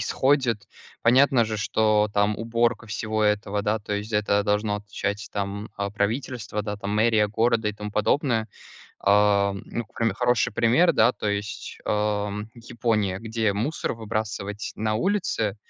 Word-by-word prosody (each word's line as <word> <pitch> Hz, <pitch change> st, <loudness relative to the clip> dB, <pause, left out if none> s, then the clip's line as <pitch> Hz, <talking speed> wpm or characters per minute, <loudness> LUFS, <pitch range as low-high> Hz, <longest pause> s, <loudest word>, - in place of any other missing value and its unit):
исходит. 120 Hz, -5 st, +1 dB, 0.4 s
Понятно 125 Hz, +1 st, +5 dB
же, 110 Hz, -1 st, -3 dB
что 105 Hz, 0 st, +2 dB
там 100 Hz, +1 st, +2 dB
уборка 115 Hz, +1 st, 0 dB
всего 110 Hz, +2 st, -2 dB
этого, 105 Hz, -1 st, +1 dB
да, 105 Hz, +2 st, +1 dB
то 105 Hz, -, -6 dB
есть- 105 Hz, +2 st, -3 dB
это 105 Hz, -1 st, +2 dB
должно 105 Hz, 0 st, +1 dB
отвечать 105 Hz, 0 st, -4 dB
там, 100 Hz, +1 st, -3 dB
а, 100 Hz, 0 st, -2 dB
правительство, 110 Hz, +1 st, -2 dB
да, 105 Hz, 0 st, -4 dB
там 100 Hz, 0 st, -5 dB
мэрия 110 Hz, -1 st, +3 dB
города, 110 Hz, 0 st, +1 dB
и -, -, -2 dB
тому 105 Hz, 0 st, -7 dB
подобное. 115 Hz, +1 st, +1 dB, 0.5 s
А, 100 Hz, 0 st, +3 dB
ну, 120 Hz, -, -4 dB
прям 115 Hz, -3 st, +1 dB
хороший 120 Hz, -4 st, +1 dB
пример, 120 Hz, +11 st, +4 dB
да 115 Hz, +3 st, +4 dB
то 105 Hz, -, -3 dB
есть, 100 Hz, +1 st, -4 dB
а, 105 Hz, -1 st, 0 dB, 0.2 s
Япония. 115 Hz, -5 st, -1 dB
Где 110 Hz, -2 st, -1 dB
мусор 115 Hz, +10 st, -2 dB
выбрасывать 105 Hz, -2 st, -4 dB
на 110 Hz, 0 st, -1 dB
улице, 115 Hz, -, 0 dB
105 Hz, 150 wpm, -25 LUFS, 105-115 Hz, 0.5 s, Понятно